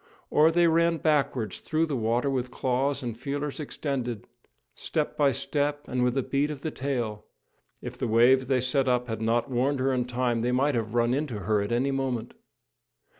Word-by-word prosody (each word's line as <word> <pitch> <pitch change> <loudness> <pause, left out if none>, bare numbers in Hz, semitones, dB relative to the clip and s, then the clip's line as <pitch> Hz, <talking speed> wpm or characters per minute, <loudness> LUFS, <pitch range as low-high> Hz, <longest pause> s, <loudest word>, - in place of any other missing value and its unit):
Or 155 +2 +5
they 170 +1 +3
ran 170 0 +3
backwards 135 - 0
through 160 0 0
the 150 -4 -3
water 120 +3 0
with 130 -2 -1
claws 135 +2 -1
and 120 -3 -4
feelers 140 +4 -4
extended, 130 -6 -3 0.5
step 155 -2 -2
by 145 -2 +3
step 145 +3 -2
and 125 -1 0
with 125 +1 +1
a 135 - +1
beat 140 +3 0
of 145 -3 -6
the 155 - -3
tail; 120 -7 -3 0.6
if 125 0 -7
the 125 - -1
waves 120 +3 +4
they 130 -2 +2
set 130 +2 +1
up 125 -1 +1
had 110 -1 -4
not 115 +4 0
warned 130 +3 +1
her 135 +1 +1
in 125 -1 0
time, 120 -1 -1
they 120 +2 0
might 140 +4 +2
have 115 -1 -2
run 120 0 +2
into 130 -7 -2
her 105 +2 +1
at 100 - -3
any 130 +4 +1
moment. 130 -4 -2
130 Hz, 195 wpm, -27 LUFS, 120-140 Hz, 0.6 s, Or